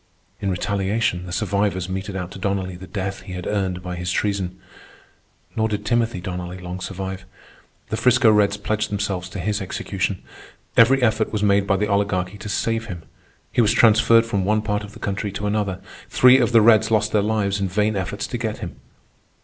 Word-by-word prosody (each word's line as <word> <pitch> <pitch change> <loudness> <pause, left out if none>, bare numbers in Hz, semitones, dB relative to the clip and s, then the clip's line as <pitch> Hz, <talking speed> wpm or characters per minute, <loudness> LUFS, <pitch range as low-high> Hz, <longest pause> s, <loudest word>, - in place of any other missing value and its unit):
In 100 - -2
retaliation, 95 0 -1
the - - -7
survivors 95 0 0
meted 95 +1 -4
out 90 -2 -4
to - - -9
Donnelly 95 -1 -2
the 95 +1 -10
death 95 +2 -4
he 90 - -9
had 90 -1 -6
earned 95 -3 -2
by 90 -1 -4
his 90 0 -3
treason. 95 -2 -1 1.0
Nor 110 0 +1
did 105 -1 -3
Timothy 115 -2 +1
Donnelly 90 0 -5
long 90 0 -6
survive. 95 0 -5 0.7
The 110 - -2
'Frisco 120 -2 +5
Reds 105 -1 +3
pledged 110 +1 -2
themselves 100 -3 -2
to 100 - -7
his 105 +2 -1
execution. 95 0 -3 0.5
Every 130 +3 +5
effort 110 -1 +2
was 105 -1 -1
made 100 -1 +3
by 100 - +2
the 105 - +1
Oligarchy 100 -1 0
to 105 - -7
save 115 +2 -1
him. 90 -6 -7 0.5
He - - +3
was 115 0 +3
transferred 115 0 +5
from 100 -4 -1
one 105 +2 +1
part 105 -1 -1
of 105 0 -10
the - - -11
country 100 0 -3
to 105 +1 -4
another. 100 -2 -1 0.3
Three 125 +1 +6
of 120 -1 +2
the 115 -1 +6
Reds 110 0 +5
lost 110 -1 +2
their 105 - +3
lives 100 -2 0
in 100 - +1
vain 105 +3 +1
efforts 95 +1 -3
to 120 - -4
get 110 -2 -3
him. - - -7
100 Hz, 200 wpm, -22 LUFS, 95-110 Hz, 1.0 s, Three